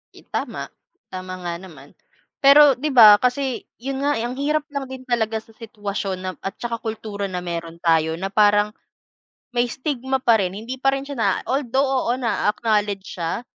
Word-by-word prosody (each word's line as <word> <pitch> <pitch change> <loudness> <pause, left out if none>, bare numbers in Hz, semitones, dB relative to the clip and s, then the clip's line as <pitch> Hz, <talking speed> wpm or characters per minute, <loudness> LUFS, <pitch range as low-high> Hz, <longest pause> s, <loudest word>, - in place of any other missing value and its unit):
I - - -15
tama, - - -4 0.4
tama 185 0 -6
nga 175 -1 -3
naman. 185 -3 -13 0.5
Pero 280 -1 +7
di 295 +2 -2
ba 215 -4 +9
kasi 255 0 -1 0.2
'yon 270 +1 -3
nga, 290 - +3
eh, 225 - -2
ang 245 +2 -4
hirap 300 +2 0
lang 280 -1 -3
din 260 0 -8
talaga 225 -3 -1
sa 225 - -21
sitwasyon 205 -4 -4
na 185 0 -3
at 195 - -5
saka 235 -1 -2
kultura 215 -2 -5
na 180 -2 -4
meron 170 -1 -6
tayo 160 -1 +2
na 190 +3 -4
parang 205 0 +4 0.8
may 240 0 +2
stigma 265 0 -2
pa 235 -3 +5
rin, 185 -2 -1
hindi 230 +6 -6
pa 270 +1 +2
rin 270 - -3
siya 285 0 -7
na 225 - +2 0.2
although, 270 0 +1 0.2
oo 235 - +2
na-a-acknowledge 210 -4 -1
siya. 170 +7 -2
225 Hz, 180 wpm, -22 LUFS, 195-265 Hz, 0.8 s, ba